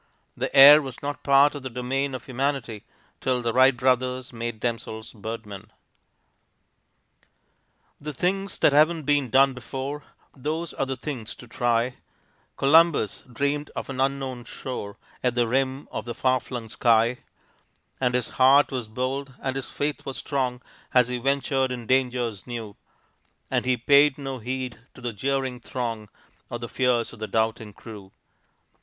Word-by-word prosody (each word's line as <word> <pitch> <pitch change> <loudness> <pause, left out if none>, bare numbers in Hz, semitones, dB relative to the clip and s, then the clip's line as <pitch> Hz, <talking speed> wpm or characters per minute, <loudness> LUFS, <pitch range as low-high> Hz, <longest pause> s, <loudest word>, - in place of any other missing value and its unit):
The - - -2
air 145 +3 +11
was 135 -2 -8
not 145 +1 -4
part 140 +1 +5
of 145 - -6
the 130 - -5
domain 130 +3 -2
of 130 - -8
humanity 130 -4 -2 0.3
till 125 -2 0
the 115 -1 0
Wright 130 0 +5
brothers 130 0 0
made 115 -2 -5
themselves 115 -2 -4
birdmen. 105 -2 -8 2.3
The 150 +1 -5
things 195 +7 -1
that 145 - +4
haven't 155 +2 +4
been 145 -2 +1
done 135 +3 +5
before, 135 +4 -5 0.3
Those 155 +5 -3
are 135 - -2
the 135 -1 -3
things 125 -5 -6
to 125 - -13
try; 120 +1 0 0.6
Columbus 150 - +4
dreamed 140 +4 -1
of - - -5
an 130 -1 -2
unknown 135 -3 -2
shore 115 -6 -6 0.3
At 125 -1 +1
the 120 -1 +2
rim 130 +2 -1
of - - -5
the 120 - -5
far 130 0 +2
flung 120 -3 -7
sky, 115 +1 +3 0.8
And 125 -1 +1
his 125 -1 0
heart 135 +3 +5
was 125 -4 -3
bold 130 +4 -3
and 130 -1 -3
his 135 - -4
faith 145 0 -2
was 135 - -6
strong 130 -3 -2 0.3
As 125 -1 +5
he 125 -1 -2
ventured 135 0 0
in 120 -2 -5
dangers 125 -5 0
new, 115 -4 -6 0.8
And - - +1
he 125 -1 +2
paid 140 +3 +5
no 135 -2 -5
heed 125 +1 -4 0.2
to 125 - -13
the 120 -2 -3
jeering 130 +3 -2
throng 115 -5 -4 0.4
Or 120 - -4
the 120 0 -6
fears 125 -2 +1
of 115 - -12
the 110 - -4
doubting 110 -1 -1
crew. 100 -3 -11
130 Hz, 160 wpm, -25 LUFS, 120-135 Hz, 2.3 s, air